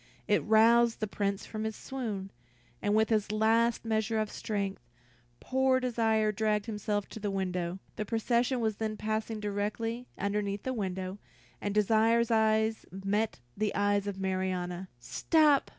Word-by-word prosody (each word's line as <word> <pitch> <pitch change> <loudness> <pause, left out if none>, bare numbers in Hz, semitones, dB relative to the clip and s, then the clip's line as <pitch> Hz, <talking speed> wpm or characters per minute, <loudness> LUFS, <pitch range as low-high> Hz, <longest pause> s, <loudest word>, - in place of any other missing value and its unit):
It 205 - +3
roused 230 +2 +5
the 215 - 0
Prince 200 -1 -2
from 215 -1 -5
his 220 -1 -2
swoon, 215 -8 -5 0.5
and 205 +1 +1
with 220 0 +3
his 210 -2 +1
last 225 +2 +2
measure 220 0 0
of 215 -1 -1
strength, 200 - -3 0.6
poor 265 0 +2
Desire 225 -3 +2
dragged 210 0 0
himself 210 -2 -2
to - - -8
the 205 -1 -2
window. 180 -2 -2 0.2
The 215 - -2
procession 235 +3 +1
was 220 -2 0
then 215 -1 -2
passing 215 +1 -2
directly 210 +4 -2
underneath 200 0 -1
the 260 - -2
window, 190 -3 -3 0.4
and 205 0 -2
Desire's 225 +2 +3
eyes 220 0 +2
met 195 - -1
the 210 0 -1
eyes 205 0 +2
of 195 -1 -4
Marianna. 185 -1 -2
"Stop! 300 - +3
215 Hz, 150 wpm, -30 LUFS, 200-225 Hz, 0.6 s, roused